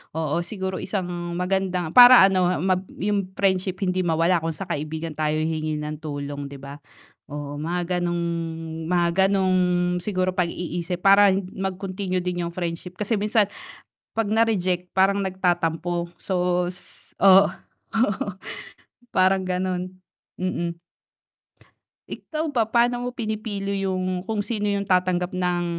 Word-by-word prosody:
oo 160 0 0
siguro 190 +1 -4
isang 175 -3 -3
magandang 180 -2 -1
para 245 0 +10
ano 185 -2 +4 0.2
mab 185 0 0 0.2
'yung 200 -2 -1
friendship 190 0 0
hindi 185 0 0
mawala 165 +1 +2
kung 165 -1 -3
sa 195 - -4
kaibigan 160 0 -4
tayo 155 0 0
hihingi 155 -1 -2
ng 150 0 -5
tulong 145 -2 -5
'di 140 0 -9
ba? 140 +2 -9 0.5
Oo 145 0 -5
mga 175 +3 -1
gano'ng 175 -1 -1 0.6
mga 175 0 +2 0.2
gano'ng 190 -1 +2 0.5
siguro 185 -2 -1
pag-iisip 175 0 -2
para 200 +1 +7 0.3
mag-continue 190 -1 -3
din 180 -1 -2
'yung 170 - -8
friendship, 175 0 -4
kasi 210 +2 0
minsan, 210 +1 +3 0.7
'pag 225 -1 0
na-reject, 185 -5 +1
parang 195 +1 +3
nagtatampo 175 -2 -1
so 180 -1 0
s 180 - -11
oo, 195 0 +8
oo 225 -3 -3 0.8
parang 190 +1 +3
ganun, 185 0 -3 0.4
mm. 170 -2 -2 1.3
Ikaw 315 0 -4
ba, 240 -6 +1
paano 240 +2 +1
mo - - -1
pinipili 205 -3 -3
'yung 185 -1 -2
kung 215 0 -1
sino 210 0 -2
'yung 200 -1 0
tatanggap 180 -1 +2
ng 180 -1 -1
185 Hz, 130 wpm, -24 LUFS, 175-195 Hz, 1.3 s, para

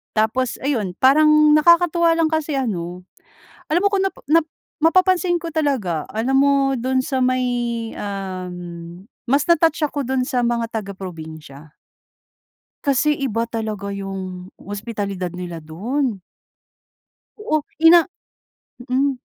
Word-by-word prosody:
tapos 220 +4 +1
ayun, 220 -10 -1
parang 305 +2 +6
nakakatuwa 340 +1 +4
lang 330 -1 +2
kasi 315 -2 -1
ano, 180 -6 -4 0.7
alam 345 +3 +3
mo 405 - +4
kung 390 -1 +1
nap - - -8
nap 325 +1 +4 0.4
mapapansin 365 +1 +3
ko 340 - -5
talaga, 255 - -1
alam 230 +6 0
mo 280 +1 +4 0.3
dun 260 +2 0
sa 265 -1 -2
may 255 0 +1 0.5
um, 190 -3 -5 0.7
mas 275 +3 +3
na-touch 330 -2 +3
ako 285 -1 -4
dun 260 -1 0
sa 255 -4 0
mga 235 -1 0
taga-probinsiya. 160 -8 -8 1.1
Kasi 290 +1 +2
iba 235 -5 -2
talaga 215 -3 -4
'yong 190 -2 -6
hospitalidad 200 -3 -5
nila 175 -2 -7
do'n. 220 - -2 1.2
Oo, 420 -8 0 0.3
ina 340 +1 +9 0.9
mm. 270 0 +1
250 Hz, 120 wpm, -21 LUFS, 195-300 Hz, 1.2 s, ina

